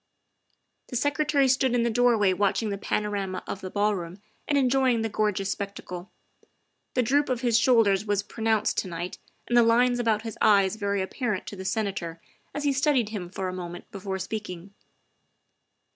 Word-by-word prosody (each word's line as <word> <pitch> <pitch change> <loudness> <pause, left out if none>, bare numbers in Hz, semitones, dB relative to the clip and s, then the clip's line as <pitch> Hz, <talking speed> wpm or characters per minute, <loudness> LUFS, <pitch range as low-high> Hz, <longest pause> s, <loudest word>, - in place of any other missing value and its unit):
The - - -7
Secretary 290 +1 +2
stood 260 -1 +2
in 240 - +2
the 235 - +1
doorway 220 -5 +3
watching 205 +3 +1
the 200 - -2
panorama 200 -3 -2
of 195 - -5
the 185 - -5
ballroom 200 -3 -1 0.3
and 290 - +2
enjoying 255 -3 +3
the 225 - -1
gorgeous 205 -2 0
spectacle; 195 -2 -6 0.9
the 250 - +3
droop 285 +5 +2
of 255 -2 -1
his 235 -3 +3
shoulders 225 -6 +4
was 205 -2 0
pronounced 220 0 0
to - - -3
night 175 +1 -5 0.3
and 240 - 0
the 240 - +8
lines 245 +2 +3
about 220 -2 +1
his 225 -2 -7
eyes 200 -2 +4
very 200 -2 -1
apparent 215 -1 -3
to - - -7
the 190 -1 -8
Senator 190 -5 -2 0.3
as 290 - -4
he 285 -1 +2
studied 270 -5 +2
him 195 -5 -5
for 190 0 -4
a 185 - -4
moment 175 -1 -7
before 195 -1 -4
speaking. 190 -1 -6
210 Hz, 175 wpm, -26 LUFS, 190-245 Hz, 0.9 s, the